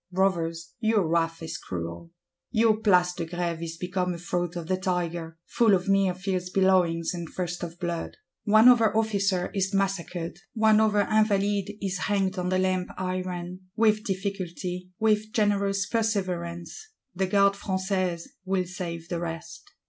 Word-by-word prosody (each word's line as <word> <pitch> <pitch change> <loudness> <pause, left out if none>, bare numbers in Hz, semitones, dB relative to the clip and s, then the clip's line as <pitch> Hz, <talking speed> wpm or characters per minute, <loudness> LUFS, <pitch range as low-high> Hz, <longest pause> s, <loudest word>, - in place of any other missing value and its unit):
Brothers, 170 -3 0
your 220 -6 +2
wrath 165 0 0
is 160 - -5
cruel! 85 - -6 0.4
Your 220 -1 +3
Place 180 -5 +3
de 175 -1 -4
Grève 170 -1 -3
is 165 0 -5
become 180 0 -2
a - - -6
Throat 175 0 -2
of 170 -2 -4
the 185 - +1
Tiger; 175 -3 -2
full 225 -4 +4
of 180 0 -2
mere 195 -2 +3
fierce 185 -1 -2
bellowings, 180 -3 +2
and 170 -2 -5
thirst 175 -1 -4
of 170 -1 -6
blood. 170 -1 -3 0.3
One 215 +2 +6
other 230 -3 +6
officer 200 -4 +1
is 195 0 0
massacred; 180 -3 -2 0.2
one 220 -1 +5
other 215 -1 +3
Invalide 205 -1 +1
is 195 -1 -2
hanged 195 -2 0
on 180 0 -1
the 185 - +2
Lamp 185 -1 0
iron: 185 -1 -3 0.2
with 215 -1 +3
difficulty, 185 -3 -4
with 215 -1 +1
generous 200 -3 +1
perseverance, 185 - -2 0.3
the 190 +1 0
Gardes 200 +1 +3
Françaises 185 -3 -1 0.2
will 190 -1 0
save 170 -2 -6
the 175 -1 -3
rest. 165 -1 -6
185 Hz, 155 wpm, -27 LUFS, 175-200 Hz, 0.4 s, One